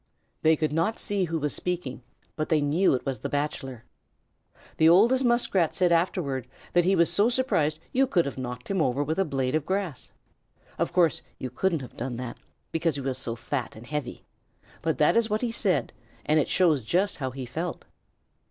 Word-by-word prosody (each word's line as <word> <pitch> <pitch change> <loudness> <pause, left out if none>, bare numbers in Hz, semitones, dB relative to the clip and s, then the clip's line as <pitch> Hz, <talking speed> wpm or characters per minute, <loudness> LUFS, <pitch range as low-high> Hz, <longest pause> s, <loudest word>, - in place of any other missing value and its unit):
They 160 0 +5
could 155 -1 -1
not 165 +8 +1
see 200 -2 0
who 165 -1 -2
was 150 -2 -1
speaking, 175 -9 -3 0.3
but 155 - -3
they 155 - +3
knew 145 +3 +3
it 125 - -5
was 135 -2 -2
the 140 - -4
Bachelor. 135 -4 -3 0.9
The 160 - +6
oldest 235 +10 +5
Muskrat 235 -9 +2
said 180 -2 +2
afterward 165 - 0 0.3
that 175 -1 +4
he 190 +1 +4
was 170 -2 +3
so 210 +3 +4
surprised 235 - +1
you 270 +1 +3
could 175 -8 +2
have 140 - -4
knocked 125 -1 -6
him 195 -3 +1
over 135 0 +1
with 160 +5 -2
a 195 - +3
blade 135 -3 -1
of 155 -1 +1
grass. 190 -5 -3 0.7
Of - - 0
course, 170 -5 +3 0.2
you 130 - -5
couldn't 165 +3 0
have 125 - -12
done 120 0 -4
it, 125 -2 -6 0.3
because 165 -2 0
he 140 - -3
was 130 -1 -1
so 115 - -2
fat 125 +2 -4
and 110 +2 -11
heavy, 145 -2 -5 0.6
but 160 -1 0
that 150 - +4
is 230 -1 +3
what 215 +1 0
he 240 -2 -1
said, 185 - 0 0.3
and 155 +1 +3
it 150 - 0
shows 165 -7 +3
just 180 - 0
how 130 -3 -2
he 130 0 -6
felt. 165 +8 -5
155 Hz, 200 wpm, -27 LUFS, 135-185 Hz, 0.9 s, The